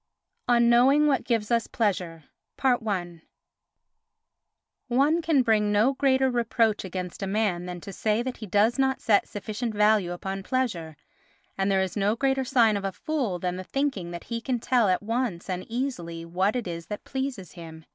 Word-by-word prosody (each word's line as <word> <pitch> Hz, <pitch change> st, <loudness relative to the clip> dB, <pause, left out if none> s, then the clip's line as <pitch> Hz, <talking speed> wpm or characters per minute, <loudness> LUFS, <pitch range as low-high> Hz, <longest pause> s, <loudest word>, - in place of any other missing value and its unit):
On 235 Hz, -1 st, +4 dB
Knowing 260 Hz, +5 st, +5 dB
what 275 Hz, -5 st, +2 dB
Gives 230 Hz, -2 st, -1 dB
us 230 Hz, -1 st, +2 dB
Pleasure 180 Hz, -7 st, -2 dB, 0.4 s
i 215 Hz, -9 st, +1 dB, 1.8 s
One 280 Hz, +7 st, +2 dB
can 315 Hz, -5 st, +3 dB
bring 215 Hz, -3 st, +2 dB
no 215 Hz, +6 st, +3 dB
greater 265 Hz, -1 st, +2 dB
reproach 230 Hz, -2 st, +1 dB
against 185 Hz, -1 st, -6 dB
a 195 Hz, -, -2 dB
man 190 Hz, -4 st, 0 dB
than 180 Hz, -1 st, -6 dB
to 195 Hz, -, -8 dB
say 215 Hz, +4 st, 0 dB
that 255 Hz, 0 st, -5 dB
he 215 Hz, -, -8 dB
does 215 Hz, +6 st, +2 dB
not 265 Hz, 0 st, +2 dB
set 205 Hz, -3 st, +2 dB
sufficient 215 Hz, +2 st, -4 dB
value 210 Hz, -3 st, +3 dB
upon 190 Hz, +2 st, -4 dB
pleasure, 190 Hz, -, -2 dB, 0.6 s
and 195 Hz, 0 st, 0 dB
there 195 Hz, -1 st, +2 dB
is 185 Hz, -2 st, -5 dB
no 205 Hz, +1 st, +1 dB
greater 265 Hz, +2 st, +1 dB
sign 235 Hz, -5 st, +3 dB
of 200 Hz, -, -5 dB
a 195 Hz, -, -1 dB
fool 245 Hz, -, -2 dB
than 180 Hz, +1 st, -3 dB
the 185 Hz, -, -5 dB
thinking 265 Hz, -7 st, -2 dB
that 170 Hz, -1 st, -7 dB
he 230 Hz, -1 st, -4 dB
can 250 Hz, +1 st, -1 dB
tell 235 Hz, -2 st, +2 dB
at 185 Hz, +2 st, +1 dB
once 230 Hz, -5 st, -2 dB
and 185 Hz, -1 st, -4 dB
easily 180 Hz, -10 st, -4 dB
what 185 Hz, +6 st, 0 dB
it 245 Hz, -5 st, -2 dB
is 170 Hz, -1 st, -6 dB
that 210 Hz, -, -6 dB
pleases 265 Hz, -9 st, -4 dB
him. 160 Hz, -2 st, -11 dB
215 Hz, 180 wpm, -26 LUFS, 185-250 Hz, 1.8 s, Knowing